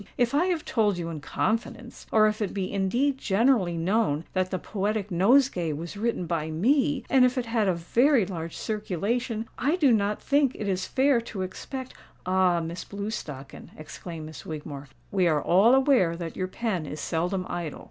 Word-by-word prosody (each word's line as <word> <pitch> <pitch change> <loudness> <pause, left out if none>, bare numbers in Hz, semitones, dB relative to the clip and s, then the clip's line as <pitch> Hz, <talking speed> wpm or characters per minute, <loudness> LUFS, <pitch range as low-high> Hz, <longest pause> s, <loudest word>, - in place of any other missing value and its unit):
If 245 +1 +1
I 305 +5 +3
have 350 -4 -1
told 210 -5 +1
you 170 -1 -4
in 160 -2 -5
confidence, 230 - -3
or 215 -1 +5
if 215 0 0
it 205 - -2
be 190 -1 -3
indeed 245 +8 +1
generally 200 -5 +2
known 165 -3 +1
that 185 -1 0
'The 185 - -2
Poetic 205 +2 -2
Nosegay' 185 - +3
was 165 +6 -6
written 220 -3 -1
by 165 -2 -2
me—and 265 - +2
if 250 +1 +3
it 250 - 0
had 225 -3 0
a 185 - +2
very 235 - +3
large 165 -3 -6
circulation—I 225 - -2
do 295 -8 +4
not 210 -2 +1
think 280 -2 +2
it 210 - -4
is 185 -1 -1
fair 265 -2 +3
to 215 -5 -5
expect——" 260 +7 -7 0.3
"Ah! 185 -2 +2
Miss 165 +2 -5
Blewstocken," 200 -10 -7
exclaimed 160 +1 -8
Miss 155 0 -9
Wigmore, 145 -2 -7 0.2
"we 185 -3 +2
are 155 -3 +3
all 195 - +5
aware 260 - +3
that 170 -2 -6
your 185 - -2
pen 185 -5 -3
is 150 - -6
seldom 180 +4 -1
idle." 170 -4 -4
200 Hz, 180 wpm, -26 LUFS, 170-240 Hz, 0.3 s, or